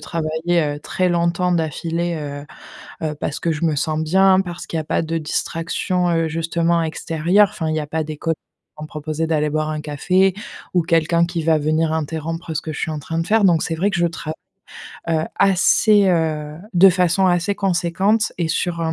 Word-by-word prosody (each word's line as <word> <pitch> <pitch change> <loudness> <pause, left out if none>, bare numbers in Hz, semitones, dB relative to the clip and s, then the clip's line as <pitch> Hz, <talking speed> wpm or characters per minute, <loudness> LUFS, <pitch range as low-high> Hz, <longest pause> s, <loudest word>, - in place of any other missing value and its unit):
travailler, 165 +2 -1
heu, 145 -1 -2
très 185 +3 -1
longtemps 175 +1 +1
d'affilée, 170 +1 -1
heu 145 -1 -6 0.6
heu, 150 - -1
parce 145 - -3
que 170 - 0
je 160 +1 -1
me 155 - +1
sens 155 +2 -1
bien, 190 +4 +4
parce 175 -2 -5
qu'il 165 - -3
y - - 0
a 155 - -5
pas - - 0
de 165 0 -2
distraction, 170 +3 -1
heu, 165 -1 +1
justement 165 +1 0
extérieure. 165 +5 +2
Enfin 160 -3 -4
il 155 - -1
y 155 - 0
a 150 - -6
pas 160 0 -2
des 155 -1 -6
col 165 +2 -1 0.4
vont 155 - -7
me - - -7
proposer 155 +1 -3
d'aller 150 -2 +1
boire 155 +1 -1
un 155 -1 -3
café 180 +6 +1 0.4
ou 175 -2 +3
quelqu'un 165 0 +2
qui 170 -2 -4
va 160 -1 +3
venir 155 +1 +1
interrompre 160 +1 -3
ce 150 - -2
que 155 - -6
je 145 - -6
suis 160 - -2
en 150 - -4
train 165 +3 -4
de 165 - -2
faire. 220 -1 +3
Donc 170 -4 +4
c'est 165 - -2
vrai 190 +6 +1
que 190 - -2
je 175 - +3
trav 160 -1 -6 0.8
heu, 160 -1 +1
assez, 195 +1 +4
heu, 155 -3 0 0.2
de 185 +2 +7
façon 180 +1 +2
assez 180 +2 +1
conséquente 195 +4 +1
et 170 -2 0
sur 170 +1 -1
un 160 -1 0
165 Hz, 210 wpm, -20 LUFS, 155-175 Hz, 0.8 s, de